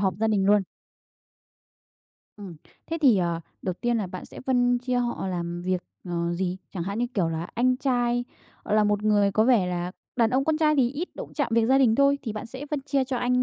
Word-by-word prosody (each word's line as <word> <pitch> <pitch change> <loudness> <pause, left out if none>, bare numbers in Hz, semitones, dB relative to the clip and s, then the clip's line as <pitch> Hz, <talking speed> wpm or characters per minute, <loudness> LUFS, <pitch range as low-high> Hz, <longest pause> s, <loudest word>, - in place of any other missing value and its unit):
họp 190 -2 +1
gia 220 - 0
đình 200 -3 +2
luôn. 205 0 +5 1.7
Ừm, 195 -5 -9 0.3
thế 330 - -3
thì, 260 -8 +6
ờ, 170 -2 0 0.2
đầu 185 - -2
tiên 240 -1 +1
là 210 -4 -1
bạn 185 0 -8
sẽ - - -10
phân 245 -1 +3
chia 250 0 -2
họ 240 -5 -2
làm 175 -1 -4
việc, 180 0 -1 0.2
ờ, 170 -1 -2
gì? 180 0 -2 0.2
Chẳng 180 - -3
hạn, 200 +4 -3
như 245 - +1
kiểu 180 -5 +1
là, 165 +1 -4
anh 250 +2 +2
trai, 245 -2 0 0.4
gọi - - 0
là, 215 0 +4
một 210 0 +1
người 205 -2 +3
có 215 +2 +3
vẻ 230 -7 +4
là 180 0 -3 0.2
đàn 230 -3 +3
ông 265 +2 +1
con 310 +1 +1
trai 305 -1 +3
thì 250 -3 +3
ít 305 +7 -4
động - - -7
chạm 290 -5 0
việc 230 -1 +3
gia 265 +2 +4
đình 245 -5 +4
thôi, 280 +2 +3
thì 225 - -4
bạn 215 +2 -6
sẽ 260 +5 -8
phân 300 -2 -1
chia 275 -1 0
cho 260 0 -3
anh 250 +1 +1
225 Hz, 235 wpm, -26 LUFS, 185-255 Hz, 1.7 s, thì